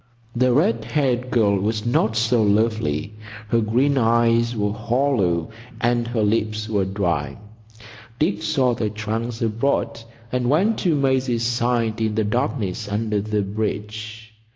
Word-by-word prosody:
The 125 +1 +3
red 115 -4 +2
haired 125 0 0
girl 105 -5 +2
was 105 +2 -2
not 110 -2 +1
so 115 +1 +2
lovely. 105 -5 +1 0.4
Her 115 +1 +2
green 130 +6 +2
eyes 115 0 +2
were 105 -1 -1
hollow 110 - 0 0.3
and 120 0 +1
her 120 -2 -1
lips 110 0 0
were 100 -3 0
dry. 85 -8 -2 0.8
Dick 160 +8 0
saw 130 -3 +1
the 110 -2 -2
trunks 110 +2 -4
aboard, 115 +2 -1 0.3
and 125 -1 0
went 195 +10 +2
to 170 -5 +1
Maisie's 130 -4 +1
side 120 -2 0
in 110 -1 0
the 110 - +1
darkness 110 -3 -2
under 105 0 -1
the 105 0 -1
bridge. 110 +2 -5
115 Hz, 140 wpm, -22 LUFS, 105-120 Hz, 0.8 s, The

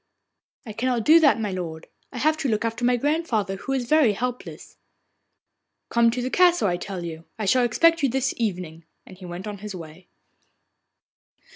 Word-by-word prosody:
'I 215 - -7
cannot 240 +1 -1
do 320 +2 +7
that, 310 -7 +4
my 210 -3 -2
lord. 165 -4 -6 0.3
I - - -8
have 310 +6 +2
to 285 -4 -2
look 215 0 0
after 230 +2 -3
my 245 0 +3
grandmother, 240 - -1
who 270 - -6
is 260 -2 -1
very 290 -5 +4
helpless.' 245 +4 -6 1.1
'Come 235 0 +3
to 245 +1 -2
the 255 - -3
castle, 350 - +4
I 175 -1 0
tell 185 -1 -6
you. 165 0 -8
I 215 - -3
shall 250 +6 +3
expect 330 +8 +3
you 275 - +2
this 265 +1 -1
evening,' 180 -7 -4 0.2
and - - -13
he 185 - -9
went 175 +3 -7
on 205 -2 -6
his 210 -1 -7
way. 165 +1 -11
230 Hz, 185 wpm, -24 LUFS, 190-260 Hz, 1.1 s, do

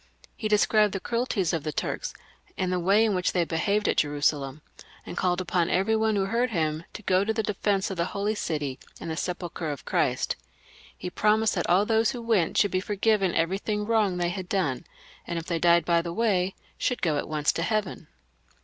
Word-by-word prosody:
He 220 - -3
described 210 0 +3
the - - -1
cruelties 230 -5 -1
of 165 -3 -1
the 155 - -2
Turks, - - -3 0.5
and 185 -1 0
the 180 - +1
way 200 +5 +4
in 215 - +1
which 180 -2 0
they 175 -2 +2
behaved 200 +6 0
at - - +1
Jeru 145 -1 +1
salem, 145 0 0 0.4
and - - -7
called 180 0 +1
upon 175 -1 0
every 195 +5 +2
one 220 -1 +2
who 195 -1 +1
heard 235 +5 +1
him 160 -5 -1
to 215 - -8
go 185 0 +3
to 220 - 0
the 220 0 -1
defence 200 -1 0
of 190 - -5
the 170 - +1
Holy 200 +3 -1
City 150 -9 -3 0.2
and 165 - -5
the - - -2
sepulchre 175 -2 -4
of 145 -2 -6
Christ. - - 0 0.6
He 180 - -6
promised 215 +2 +2
that 175 - -2
all 185 +4 +4
those 225 0 +3
who 245 - -5
went 215 -8 +1
should 205 - +3
be 185 - +1
forgiven 200 -1 +1
everything 195 +5 0
wrong 210 -5 +2
they 175 -1 0
had 185 0 -5
done, 155 -11 -1 0.4
and 170 - -3
if 165 - -4
they 170 -2 -1
died 170 -1 +4
by 170 -1 +3
the 170 0 -5
way, 195 -4 +1 0.2
should 250 - -1
go 155 -4 +2
at - - -5
once 150 -1 +1
to - - -3
heaven. 205 -4 -2
185 Hz, 215 wpm, -27 LUFS, 170-210 Hz, 0.6 s, way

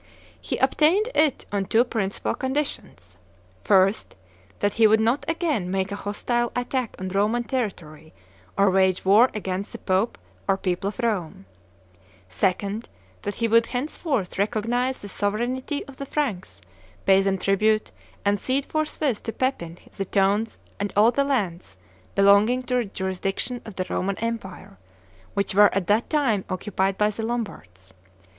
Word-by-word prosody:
He - - -3
obtained 375 +9 +3
it 300 -3 +2
on 200 -1 0
two 225 +6 +4
principal 210 -6 -2
conditions: 245 - -4 0.5
1st, 195 +1 +3 0.4
that 205 0 0
he 225 -1 +5
would 220 +1 +4
not 230 +5 +1
again 305 - -1
make 190 +1 -1
a - - -2
hostile 240 +4 -1
attack 245 -1 -2
on 185 0 -4
Roman 210 +5 +1
territory 170 - -4 0.5
or 200 -1 +4
wage 190 -1 +2
war 215 +6 +6
against 195 -1 -4
the - - -5
Pope 190 +4 0 0.3
or 195 -1 +3
people 185 0 -2
of 205 - -4
Rome; 205 - -2 0.9
2d, 200 - -1 0.4
that 205 -1 -4
he 230 - 0
would 230 +1 +4
henceforth 255 - -2
recognize 240 +5 0
the 205 - -7
sovereignty 240 +8 -2
of 275 -1 -13
the 275 - -6
Franks, 245 -13 -3 0.4
pay 195 0 +6
them 195 0 +1
tribute, 215 +3 +1 0.3
and 200 0 +2
cede 265 +5 0
forthwith 305 -6 -1
to 225 - -4
Pepin 180 -11 -2 0.2
the 195 - -3
towns 200 +3 +1 0.2
and 205 0 -2
all 215 +3 +6
the 280 +3 +1
lands, 180 - -2 0.4
belonging 205 +6 +5
to 250 - -4
the 245 - +1
jurisdiction 195 +5 -3
of 215 - -9
the 185 - -2
Roman 195 +1 -2
empire, 225 - -5 0.6
which 200 -1 0
were 205 +1 +6
at 195 -2 0
that 210 +5 +1
time 255 -11 +1
occupied 190 0 -1
by 210 0 +2
the 220 +2 -5
Lombards. 95 - -5
210 Hz, 150 wpm, -24 LUFS, 190-245 Hz, 0.9 s, war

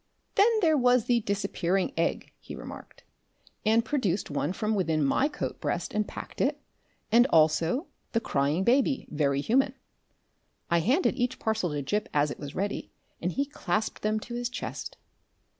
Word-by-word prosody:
"Then 405 - +5
there 320 -4 +4
was 245 -2 +4
the 240 -1 +3
Disappearing 195 0 -1
Egg," - - -1
he - - -9
remarked, - - -10 0.6
and 225 +2 +3
produced 210 - -1
one 145 +2 -1
from 215 +3 -1
within 160 -7 +1
my 260 - +3
coat 300 - -5
breast - - -2
and 210 0 0
packed - - -7
it, - - +1 0.5
and 240 +3 +6
also 160 - +3 0.3
The 230 - +3
Crying 150 -3 0
Baby, 265 +4 +2
Very 140 -2 +1
Human. 260 - +2 1.0
I 170 - +4
handed 265 - +2
each 250 0 0
parcel 220 -5 0
to 145 -2 -3
Gip 210 +9 -1
as 145 0 +3
it - - -7
was 145 -2 -7
ready, 200 +1 -3 0.3
and 180 - 0
he 280 - 0
clasped 220 -6 -2
them 215 +1 +1
to 240 - -8
his 240 0 -2
chest. 250 - -6
215 Hz, 165 wpm, -28 LUFS, 165-245 Hz, 1.0 s, and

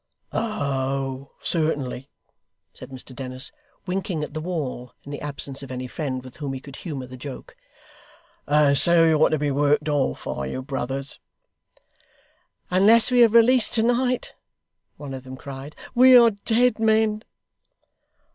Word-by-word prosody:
'Oh, 135 -9 -2
certainly,' 145 -5 -2 0.6
said - - -11
Mr 130 -1 -9
Dennis, 130 -1 -3 0.3
winking 180 -4 -2
at 150 - -7
the 155 - -4
wall 150 -8 -5
in 145 - -10
the 145 - -6
absence 140 -1 -4
of 135 - -9
any 130 0 -5
friend 130 -1 -4
with 130 -1 -13
whom 145 -4 -4
he 135 - -5
could 140 +1 -12
humour 145 -7 -6
the 130 0 -11
joke. 135 +1 -9 0.9
'And 145 -1 +4
so 170 +3 +4
you're 155 -1 +4
to 155 - +1
be 145 -1 -1
worked 145 +2 +2
off, 145 -3 -1
are 70 0 -3
you, 130 - -5
brothers?' 135 0 -5 1.5
'Unless 220 +6 +5
we 245 -1 +6
are - - +8
released 235 +1 +4
to 225 - +2
night,' 245 +1 0 0.6
one 145 -2 -7
of 130 -1 -7
them 130 0 -9
cried, 140 +2 -9 0.2
'we 255 +1 +8
are 235 -1 +6
dead 225 +3 +1
men! 220 -1 +2
145 Hz, 150 wpm, -23 LUFS, 135-210 Hz, 1.5 s, are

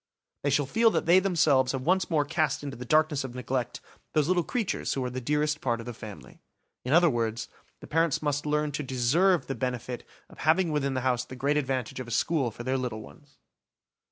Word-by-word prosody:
They 145 - 0
shall 145 +1 +2
feel 225 - +3
that 170 -7 -1
they 175 +3 +6
themselves 150 -9 +3
have 130 -1 -3
once 185 +4 +2
more 155 -4 +2
cast 155 0 0
into 140 -3 -5
the 125 - -8
darkness 155 0 +2
of 130 -2 -7
neglect 125 -1 -3 0.3
those 155 -2 +2
little 180 0 +3
creatures 230 +3 -2
who 135 - -1
are 125 - -3
the 130 +1 -4
dearest 150 +3 0
part 120 -3 0
of 115 - -8
the 120 - -5
family. 110 -2 -11 0.4
In 125 - -3
other 170 +3 +6
words, 115 -5 -1 0.3
the - - -9
parents 165 -1 +1
must 145 0 -1
learn 150 0 0
to 150 - -3
deserve 145 +8 +2
the 135 - -3
benefit 125 -1 -4 0.2
of - - -17
having 165 +2 +3
within 140 -3 0
the 130 - 0
house 125 -1 +1
the 130 - -10
great 140 +4 0
advantage 130 -4 -2
of 130 - -6
a - - -8
school 135 +3 +1
for 115 +2 -9
their 130 +1 0
little 115 -4 -4
ones. 145 +4 -17
140 Hz, 220 wpm, -28 LUFS, 125-155 Hz, 0.4 s, they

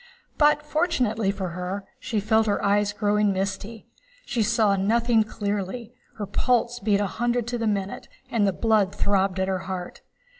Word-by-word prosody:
But, 295 0 +4
fortunately 255 - 0
for 195 -2 -2
her, 180 +3 -4
she 230 -5 -2
felt 220 +2 +2
her 205 - 0
eyes 205 0 +2
growing 210 0 +1
misty, 195 +3 -4 0.4
she 235 - -1
saw 215 -2 +3
nothing 225 +4 +2
clearly, 210 +2 -4 0.2
her 210 - -3
pulse 245 +3 +1
beat 205 -2 +2
a 205 - +1
hundred 240 +3 -1
to 240 -1 -2
the 225 - 0
minute, 200 -2 -2 0.2
and 210 -3 +2
the - - +3
blood 210 -1 +1
throbbed 195 -1 +1
at 190 - +1
her 190 -1 0
heart. 180 -2 -5
210 Hz, 165 wpm, -25 LUFS, 195-230 Hz, 0.4 s, But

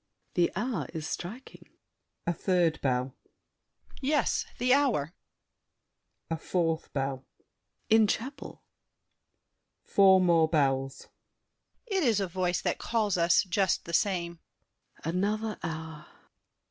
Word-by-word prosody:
The 175 -2 +2
hour 210 - -2
is 155 -2 -4
striking. 215 +13 -7 0.6
[A 170 - +1
third 170 -2 +1
bell. 130 -1 0
DIDIER. - - -30
Yes, 285 -1 +1
the 250 +1 +3
hour! 235 - +1 1.2
[A 165 - 0
fourth 165 -1 -1
bell. 135 -1 -3 0.6
SAVERNY. 220 0 +7
In - - +3
chapel! 260 +7 -4 1.2
[Four 190 -1 +5
more 170 -3 +4
bells. 135 -3 0 0.9
DIDIER. 395 -4 0
It - - 0
is 220 -3 +3
a 195 - -1
voice 180 0 -1
that - - -1
calls 215 -4 0
us, 170 -1 +4
just 190 0 0
the 170 - -7
same. 170 -3 0 0.6
SAVERNY. 165 +3 -2
Another 215 +2 -1
hour! 160 -2 -6
175 Hz, 120 wpm, -29 LUFS, 160-210 Hz, 1.2 s, SAVERNY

